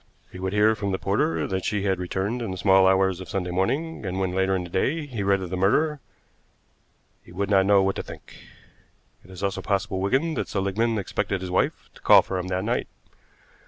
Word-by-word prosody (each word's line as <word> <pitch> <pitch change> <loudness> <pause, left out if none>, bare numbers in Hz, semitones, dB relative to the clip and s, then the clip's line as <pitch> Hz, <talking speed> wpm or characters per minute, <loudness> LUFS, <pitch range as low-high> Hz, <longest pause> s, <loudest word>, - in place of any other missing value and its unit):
He 90 - -10
would 95 0 -2
hear 105 +1 +4
from 100 -2 -3
the 95 - 0
porter 80 -6 0
that 95 -1 -3
she 105 -2 -1
had 95 -2 0
returned 95 +6 -2
in 115 - -3
the 95 - -5
small 95 0 +5
hours 95 -1 +2
of 95 - -9
Sunday 90 -2 -2
morning, 135 - -1
and 95 -1 -3
when, 95 -1 0
later 95 0 +1
in 90 - -2
the 90 - -8
day, 150 - 0
he 120 -7 -5
read 100 0 +2
of 90 - -7
the - - -1
murder 150 +12 +2 1.2
he - - -16
would 100 +3 -3
not 95 -1 +4
know 100 -1 +5
what 95 0 0
to - - -2
think. - - -12 0.9
It - - -19
is 95 +1 -9
also 100 -1 -1
possible, 95 -2 -1
Wigan, 135 +12 +1
that - - -3
Seligmann 105 +4 0
expected 100 -1 -2
his 95 -1 -5
wife 90 - -1
to - - -18
call - - +7
for 95 - -3
him 90 - -4
that 95 0 -2
night. 120 +2 -1
95 Hz, 225 wpm, -25 LUFS, 95-105 Hz, 1.2 s, call